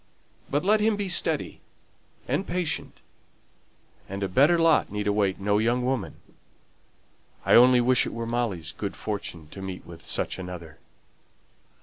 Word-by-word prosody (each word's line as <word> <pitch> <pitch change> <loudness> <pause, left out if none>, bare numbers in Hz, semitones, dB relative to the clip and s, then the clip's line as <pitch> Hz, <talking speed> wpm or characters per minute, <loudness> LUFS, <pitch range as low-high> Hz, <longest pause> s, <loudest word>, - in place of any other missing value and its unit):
But 145 +5 -1
let 215 +2 +4
them 215 0 +2
be 205 -1 -3
steady 180 - 0 0.7
and 195 - -1
patient, 180 -2 -3 1.1
and 100 +1 -4
a - - 0
better 145 - +4
lot 165 -8 +3
need 105 0 -3
await 100 -2 +1
no 100 +1 +1
young 120 +3 +1
woman. 125 -6 -2 1.3
I - - +3
only 125 +1 +7
wish 125 +1 +3
it - - -6
were 115 0 -3
Molly's 115 -9 -2
good 100 +2 -5
fortune 100 -7 -5
to 95 - -9
meet 95 -1 -7
with 85 -1 -11
such - - -1
another." 90 -4 -8
110 Hz, 145 wpm, -26 LUFS, 95-135 Hz, 1.3 s, only